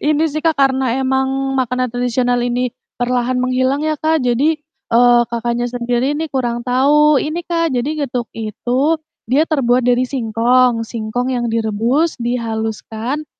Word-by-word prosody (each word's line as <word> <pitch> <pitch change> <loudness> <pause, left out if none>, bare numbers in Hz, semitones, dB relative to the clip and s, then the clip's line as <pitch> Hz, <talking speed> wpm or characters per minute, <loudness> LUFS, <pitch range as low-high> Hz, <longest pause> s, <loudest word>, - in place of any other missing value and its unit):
Ini 300 +1 +2
sih, 310 +1 -4
Kak, 325 -1 +2
karena 265 -2 +2
emang 265 0 0
makanan 255 -1 0
tradisional 245 0 0
ini 245 0 -1 0.2
perlahan 250 +1 0
menghilang 255 +3 0
ya, 310 - +1
Kak. 315 +2 +1
Jadi, 285 +6 +2 0.3
eee, 240 +1 +5
Kakaknya 235 +1 -1
sendiri 245 +3 -1
nih 320 - -2
kurang 240 -2 -2
tahu. 285 +3 +4
Ini 310 +3 -3
Kak, 335 -1 0
jadi 250 +5 -1 0.2
getuk 245 -2 -3
itu 245 +8 -1 0.3
dia 285 +4 +4
terbuat 250 -5 +1
dari 245 0 +3
singkong, 240 0 +2
singkong 235 +3 -3
yang 240 -1 -1
direbus, 230 +8 0
dihaluskan 230 +3 -3
250 Hz, 145 wpm, -17 LUFS, 240-275 Hz, 0.3 s, eee